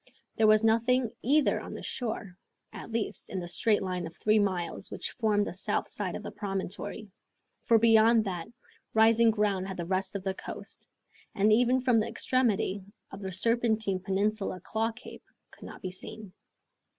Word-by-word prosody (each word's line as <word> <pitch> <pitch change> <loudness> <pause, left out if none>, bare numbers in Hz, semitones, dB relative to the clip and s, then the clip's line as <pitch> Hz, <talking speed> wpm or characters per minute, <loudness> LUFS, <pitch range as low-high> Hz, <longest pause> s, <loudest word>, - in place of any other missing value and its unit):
There 220 - +4
was 215 0 +5
nothing 230 +2 +3
either 290 +4 +3
on - - -8
the - - -8
shore, 220 -6 -4 0.4
at - - -9
least, 225 -1 -3
in 190 - -3
the 175 - -5
straight 210 +4 +2
line 180 -2 -3
of 165 - -13
three 215 0 +3
miles 185 -4 -1
which - - -5
formed 210 -3 +1
the - - -5
south 200 +3 -2
side 195 -4 -3
of - - -6
the - - -6
promontory, 200 +1 -5 0.6
for 230 - +6
beyond 225 0 +5
that, 175 -4 -4 0.5
rising 225 +1 +5
ground 205 -3 0
had 190 - -6
the 170 - -3
rest 190 +2 -1
of 195 - -3
the 190 -1 -1
coast, - - -7 0.5
and 210 +1 +4
even 245 +3 +3
from 250 -3 +3
the 215 - 0
extremity 225 -5 0 0.3
of 195 - -9
the 190 -1 -4
Serpentine 220 -1 +1
Peninsula 195 0 -1
Claw 220 +5 -1
Cape 235 +2 -12 0.3
could - - -13
not - - -11
be 185 - -3
seen. 190 +1 -9
210 Hz, 175 wpm, -29 LUFS, 190-225 Hz, 0.6 s, for